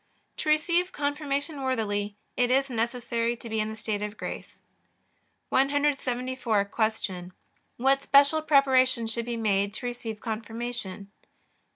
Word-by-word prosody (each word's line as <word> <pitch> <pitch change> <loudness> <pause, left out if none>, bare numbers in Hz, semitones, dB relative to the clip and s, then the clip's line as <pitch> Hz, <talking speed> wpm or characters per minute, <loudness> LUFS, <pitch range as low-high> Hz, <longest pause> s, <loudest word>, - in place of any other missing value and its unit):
To 310 - -2
receive 340 +4 +2
Confirmation 285 0 -2
worthily 210 -5 -1 0.2
it 245 -1 +2
is 270 +1 +2
necessary 235 0 -1
to 235 - -8
be 220 -1 -1
in 215 0 0
the 220 - -6
state 215 -1 -3
of 210 +1 -4
grace. - - -6 0.9
174. 260 -5 +1
Q. 200 -4 -2 0.5
What 270 +2 +3
special 280 +3 +5
preparation 260 -5 +4
should 225 +1 -2
be 240 -1 -3
made 200 -2 +1
to 250 - -5
receive 235 -3 -4
Confirmation? 225 -3 -5
240 Hz, 130 wpm, -27 LUFS, 220-275 Hz, 0.9 s, special